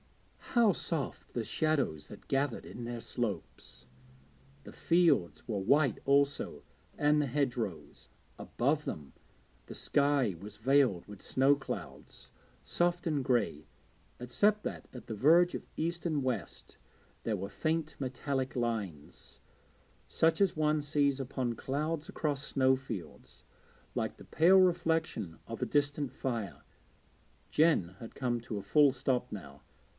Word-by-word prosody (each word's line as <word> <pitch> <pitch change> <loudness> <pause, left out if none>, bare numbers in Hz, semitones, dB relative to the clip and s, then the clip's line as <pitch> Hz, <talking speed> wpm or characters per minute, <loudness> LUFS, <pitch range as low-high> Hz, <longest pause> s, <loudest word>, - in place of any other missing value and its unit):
how 230 -4 +6
soft 160 -5 -3
the 120 - -1
shadows 140 - 0
that - - -12
gathered 135 -2 0
in 120 - -8
their 120 0 -4
slopes! 115 - -5 0.8
The - - -11
fields 165 - +2
were 105 -4 -1
white 135 +4 +3
also, 140 +1 +1 0.3
and 150 0 +3
the 145 - 0
hedgerows. 120 - -3 0.3
Above 145 +5 0
them 75 - -6 0.5
the - - -8
sky 140 -8 +2
was 105 +4 -10
veiled 130 -5 +3
with 105 -2 -11
snow 135 +2 +3
clouds, 140 - -8 0.3
soft 175 0 0
and 150 -4 0
grey, 120 - 0 0.5
except 205 - +2
that - - -5
at 125 - -10
the 115 - -5
verge 170 - +5
of - - -6
east 170 +2 -2
and 155 -4 +1
west 120 - -4 0.5
there 110 -3 -1
were 95 +1 -4
faint 155 +7 -2
metallic 130 0 -2
lines, 105 - -4 0.7
such 165 +3 +2
as 195 -5 +3
one 155 0 +2
sees 145 -2 +1
upon 130 -2 -2
clouds 150 +6 -3
across 145 -3 -2
snowfields, 130 - -2 0.5
like - - -2
the - - -13
pale 180 +4 +5
reflections 165 - +1
of 115 +1 -6
a - - +2
distant 145 +1 0
fire. 115 -8 -4 0.9
Jen 145 - +3
had 115 - -10
come 120 -3 -1
to 115 -2 -5
a 100 - -5
full 145 +7 +5
stop 125 -1 -1
now. 70 -9 -9
135 Hz, 135 wpm, -32 LUFS, 115-150 Hz, 0.9 s, how